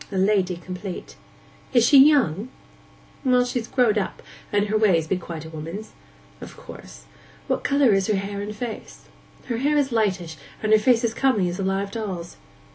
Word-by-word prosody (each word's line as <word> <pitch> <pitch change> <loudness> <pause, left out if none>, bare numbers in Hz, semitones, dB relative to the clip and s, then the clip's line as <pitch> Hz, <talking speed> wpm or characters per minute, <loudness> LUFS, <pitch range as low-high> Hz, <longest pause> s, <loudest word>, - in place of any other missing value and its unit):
A 195 - -3
lady 190 -2 +2
complete.' 180 +2 -7 0.6
'Is 240 -2 +5
she 275 +3 +7
young?' 250 - +2 0.7
'Well, 250 -2 +3
she's 245 -2 -3
growed 235 -5 +2
up, 195 - -5 0.3
and 205 0 +2
her 210 +1 -2
ways 190 -7 +3
be 175 - 0
quite 170 -3 -7
a - - -8
woman's.' 165 +7 -7 0.5
'Of - - -10
course. - - -12 0.4
What - - -2
colour 280 -5 +3
is 195 -1 +1
her 215 - +1
hair 200 +1 -4
and 210 +1 -6
face?' 230 0 -7 0.4
'Her 235 -3 -3
hair 290 +4 +1
is 275 -2 +1
lightish, 190 -8 -1 0.3
and 215 - 0
her 215 - +7
face 235 +2 +3
as 230 -1 0
comely 230 -9 +1
as 175 +3 -6
a - - -1
live 195 +1 -1
doll's. 190 -7 -5
210 Hz, 185 wpm, -23 LUFS, 185-240 Hz, 0.7 s, she